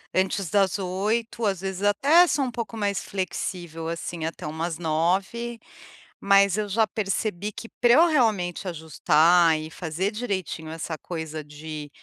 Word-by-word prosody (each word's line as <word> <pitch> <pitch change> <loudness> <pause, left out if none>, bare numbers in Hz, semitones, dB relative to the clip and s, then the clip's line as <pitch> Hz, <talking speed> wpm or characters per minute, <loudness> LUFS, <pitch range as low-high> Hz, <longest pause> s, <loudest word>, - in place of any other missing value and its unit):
antes 190 -1 0
das 200 0 +2
20h, 215 +5 -1
às 195 -3 0
vezes, 190 0 -4
até 280 - +5
sou 275 -4 +1
um 245 - -3
pouco 230 -1 -5
mais 200 -2 -1
flexível 175 -3 -4
assim 170 0 -5
até 160 -1 -5
umas 160 +1 -3
21h, 190 +9 -1 0.6
mas 200 -1 +4
eu 210 -1 -1
já 220 +3 +3
percebi 210 0 -2
que 230 - -9
pra 240 0 +5
eu 330 +6 +6
realmente 210 - +1
ajustar 165 0 +3
e 155 +1 -6
fazer 175 +4 -2
direitinho 190 -8 -4
essa 160 -1 -5
coisa 160 -3 -6
de 150 0 -8
190 Hz, 150 wpm, -25 LUFS, 165-210 Hz, 0.6 s, eu